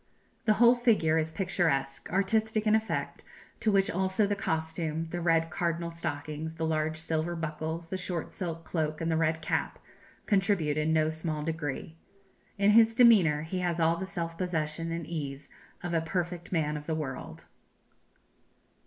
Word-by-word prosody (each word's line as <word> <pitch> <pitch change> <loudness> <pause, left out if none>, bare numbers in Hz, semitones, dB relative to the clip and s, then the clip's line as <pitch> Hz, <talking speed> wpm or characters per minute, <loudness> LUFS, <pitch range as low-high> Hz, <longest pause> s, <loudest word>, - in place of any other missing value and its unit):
The 215 - +5
whole 235 +2 +6
figure 215 -10 +3
is 160 0 -2
picturesque 160 -7 -1
artistic 215 +3 +1
in 215 - +4
effect; 220 0 -1 0.4
to 220 - +2
which 195 -1 +3
also 190 +3 +1
the 205 0 0
costume 160 -2 -2
the 175 - -3
red 165 -1 +2
cardinal 170 0 -1
stockings, 160 -1 -5
the 160 0 -2
large 155 0 0
silver 165 +1 -1
buckles, 160 +1 -4
the 190 - -2
short 180 -3 -4
silk 165 -2 -4
cloak, 155 -2 -2
and 165 0 -1
the - - +2
red 160 0 +1
cap - - -1 0.5
contribute 190 -7 +2
in 155 +1 +1
no 155 0 +3
small 155 -1 -3
degree. 160 0 -4 0.6
In 200 +1 +4
his 225 +1 +6
demeanour 195 - +6
he 180 +3 -3
has 175 -2 -1
all 165 0 +3
the 190 - -4
self 170 -3 -4
possession 165 -2 -2
and 165 -1 -3
ease 145 -3 -5 0.3
of 175 -1 -3
a 165 - +2
perfect 175 +1 -3
man 150 -4 0
of 150 - -9
the 160 - 0
world." 140 -4 -6
165 Hz, 165 wpm, -29 LUFS, 155-185 Hz, 0.6 s, whole